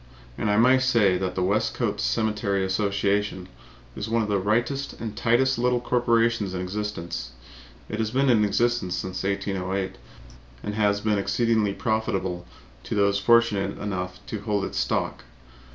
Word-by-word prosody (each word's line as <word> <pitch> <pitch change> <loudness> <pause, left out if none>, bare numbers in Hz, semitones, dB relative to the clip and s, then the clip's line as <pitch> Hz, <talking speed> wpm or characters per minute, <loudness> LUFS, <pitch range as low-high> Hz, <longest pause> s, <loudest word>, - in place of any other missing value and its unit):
And 105 - -1
I 105 - +3
may 130 +3 +5
say 115 -7 +3
that 90 -1 -2
the 90 - 0
Westcote 100 +4 0
Cemetery 100 - 0
Association 100 -1 0 0.5
is 105 - -4
one 115 0 +2
of 105 - -4
the 100 -1 +2
rightest 120 +8 0
and 110 -2 -5
tightest 125 +3 +2
little 125 0 +2
corporations 115 -4 +1
in 90 - -2
existence. 90 -7 -4 0.5
It 105 - -5
has 110 -1 0
been 135 +4 +1
in 115 -4 +4
existence 105 -2 +1
since 95 0 -4
1808 95 -1 -2 0.6
and 105 - -3
has 105 -1 +1
been 105 -1 +1
exceedingly 110 -1 +1
profitable 95 -5 -2 0.4
to - - -3
those 100 -1 +2
fortunate 105 -2 +3
enough 90 -3 -4
to 110 - -5
hold 105 -2 -1
its - - -3
stock. - - -1
105 Hz, 150 wpm, -25 LUFS, 95-115 Hz, 0.6 s, may